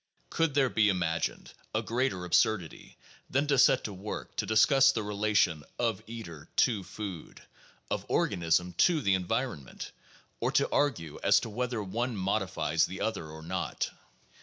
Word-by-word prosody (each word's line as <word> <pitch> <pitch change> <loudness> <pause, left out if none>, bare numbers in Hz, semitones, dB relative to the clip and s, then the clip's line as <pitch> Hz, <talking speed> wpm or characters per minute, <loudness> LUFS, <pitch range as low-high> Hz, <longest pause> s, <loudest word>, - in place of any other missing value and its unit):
Could 165 -4 +1
there 135 -3 +3
be 105 -1 +4
imagined 85 -4 -1 0.2
a - - +1
greater 115 -7 -1
absurdity 90 0 0 0.3
than 140 +2 +1
to 140 -3 +2
set 130 - +5
to 105 - -5
work 100 +3 -7
to - - -1
discuss 135 +5 +5
the 110 -4 -2
relation 105 -6 +1
of 115 -4 0
eater 85 -10 -9
to 115 -6 +3
food, 95 -5 -8 0.5
of - - -1
organism 90 +1 +1
to 170 -3 +5
the 100 -6 +2
environment, 90 - -3 0.5
or - - 0
to - - +3
argue 115 - 0
as - - +5
to 115 - -6
whether 120 -1 -2
one 115 +4 -2
modifies 95 -5 0
the 95 - -7
other 110 -8 -2
or 80 0 -10
not 80 - -3
105 Hz, 155 wpm, -30 LUFS, 90-120 Hz, 0.5 s, set